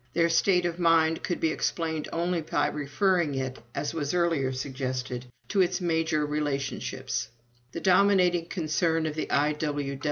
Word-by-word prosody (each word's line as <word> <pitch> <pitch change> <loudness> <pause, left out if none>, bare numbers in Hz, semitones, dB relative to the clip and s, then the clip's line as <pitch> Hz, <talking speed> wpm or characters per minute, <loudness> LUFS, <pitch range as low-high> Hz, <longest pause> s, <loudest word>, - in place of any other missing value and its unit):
Their 170 +1 +3
state 180 +2 +3
of 175 0 -2
mind 165 -1 +3
could 175 - -2
be 160 - +1
explained 160 -1 -2
only 170 0 0
by 155 - 0
referring 150 +2 0
it, 130 -1 -3 0.2
as 145 +2 -2
was 150 0 -2
earlier 165 -7 +1
suggested, 130 -1 -4 0.2
to 200 - +3
its 180 - +1
major 160 -3 +1
relationships. 145 -5 -2 0.4
The - - -5
dominating 180 -3 +4
concern 165 -1 0
of 155 - -2
the 155 - -4
I. 150 +1 +2
160 Hz, 150 wpm, -27 LUFS, 145-175 Hz, 0.4 s, dominating